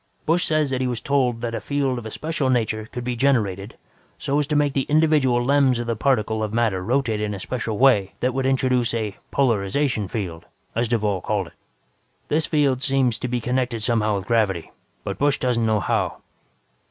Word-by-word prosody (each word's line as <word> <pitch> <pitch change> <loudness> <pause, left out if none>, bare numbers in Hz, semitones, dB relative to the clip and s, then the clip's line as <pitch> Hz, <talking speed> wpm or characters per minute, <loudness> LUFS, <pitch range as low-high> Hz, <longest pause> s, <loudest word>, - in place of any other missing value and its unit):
"Busch 170 +3 +2
says 155 -3 +1
he 130 -1 0
was 120 -2 -2
told 125 -2 0
that 120 -1 -3
a - - -3
field 140 -3 -1
of 110 - -8
a - - -5
special 155 +2 -2
nature 110 -3 0
could 125 - -5
be 125 0 -2
generated 110 -6 0 0.4
so 140 +2 0
as 145 - 0
to 150 - -1
make 145 -1 +2
the 135 - -1
individual 145 -6 +3
lems 135 -2 +3
in 120 - -3
the 115 0 -1
particles 110 -3 +1
of 105 - -2
matter 110 -5 0
rotate 115 -1 0
in 105 -1 -2
a - - -7
special 115 0 -3
way 105 -7 +4
that 125 0 0
would 135 0 0
introduce 130 -3 +1
a 110 -3 -2
'polarization 115 -1 +1
field', 90 -5 -5 0.3
as 115 +1 0
Duvall 105 -5 0
called 105 -1 -1
it. - - -26 0.8
This 155 +2 +1
field 140 -4 +1
seems 135 -4 +1
to - - -3
be 125 0 -1
connected 125 -1 -1
somehow 110 -2 +1
with 95 -2 -4
gravity, 105 -7 0 0.3
but - - -5
Busch 145 0 +2
wasn't 120 -3 +1
told 110 -3 +1
how. - - 0
120 Hz, 200 wpm, -23 LUFS, 110-135 Hz, 0.8 s, way